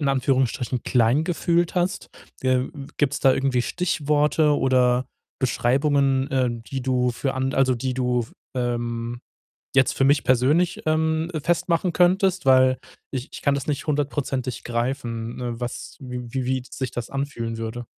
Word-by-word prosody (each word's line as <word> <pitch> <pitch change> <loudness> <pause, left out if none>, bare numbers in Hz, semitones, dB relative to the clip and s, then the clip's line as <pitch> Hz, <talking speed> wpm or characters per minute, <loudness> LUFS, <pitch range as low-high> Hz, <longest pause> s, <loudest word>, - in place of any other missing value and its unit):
in 145 - +1
Anführungsstrichen, 130 -2 0
klein 125 +4 +3
gefühlt 170 0 +1
hast? 180 +2 -1 0.3
Äh, 130 - 0
äh, - - -6 0.3
gibt's 145 -1 0
da 135 -2 +5
irgendwie 135 -2 +1
Stichworte 150 -2 +1
oder 125 -1 +2 0.3
Beschreibungen, 135 +1 +2
äh, 130 -2 +2
die 120 +3 -5
du 125 -1 +1
für 130 +2 -2
an 130 0 -1
also, 130 -1 +3
die 130 +2 -2
du 125 -1 +1
f 115 - -7 0.2
ähm, 120 -1 -2 0.6
jetzt 130 -1 +4
für 135 - 0
mich 140 +1 +4
persönlich, 145 +8 +2
ähm, 160 +2 +1
festmachen 170 +2 +1
könntest? 185 +1 +3
Weil 130 -1 +5 0.3
ich 130 -1 -4
ich - - -8
kann 140 -1 +2
das 140 - -3
nicht 145 0 -2
hundertprozentig 140 -4 -2
greifen, 120 -1 -3
äh, 120 -1 -3
was 120 0 -6
wie 125 -2 -7
wie 130 -1 -1
wie 130 0 -1
sich 130 -2 -4
das 120 -1 -5
anfühlen 135 -5 -3
würde. 115 +2 -5
130 Hz, 155 wpm, -24 LUFS, 125-145 Hz, 0.6 s, da